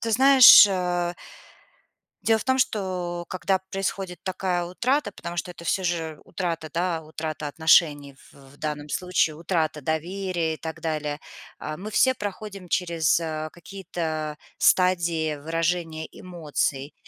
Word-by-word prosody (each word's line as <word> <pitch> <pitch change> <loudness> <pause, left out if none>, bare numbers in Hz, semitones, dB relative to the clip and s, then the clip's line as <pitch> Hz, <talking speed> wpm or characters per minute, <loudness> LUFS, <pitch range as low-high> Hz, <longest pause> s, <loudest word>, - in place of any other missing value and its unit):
ты 230 - -2
знаешь, 265 0 +9
э 180 -2 -1 1.1
дело 225 -1 +3
в 210 - -6
том, 260 0 +1
что 180 -7 -1
когда 185 +2 0
происходит 195 -1 -3
такая 185 -2 -1
утрата, 235 +6 -1
потому 170 0 -7
что 180 - -3
это 170 -1 -11
всё 190 +2 0
же 165 -3 -2
утрата, 165 -4 -4
да, 170 -1 -1
утрата 155 -1 -5
отношений, 145 -3 +3 0.2
в 140 0 -18
данном 150 -1 -4
случае 165 -2 0
утрата 160 -3 -1
доверия 170 +2 -2
и - - -9
так 160 0 -7
далее. 150 -2 -3 0.4
А, 155 - -5
мы 205 +5 -7
все 260 +4 +3
проходим 200 -3 -7
через 170 -4 +1 0.4
какие-то 165 -4 -5 0.2
стадии 170 -4 +2
выражения 165 +1 -2
эмоций. 150 -5 -3
175 Hz, 130 wpm, -25 LUFS, 155-185 Hz, 1.1 s, знаешь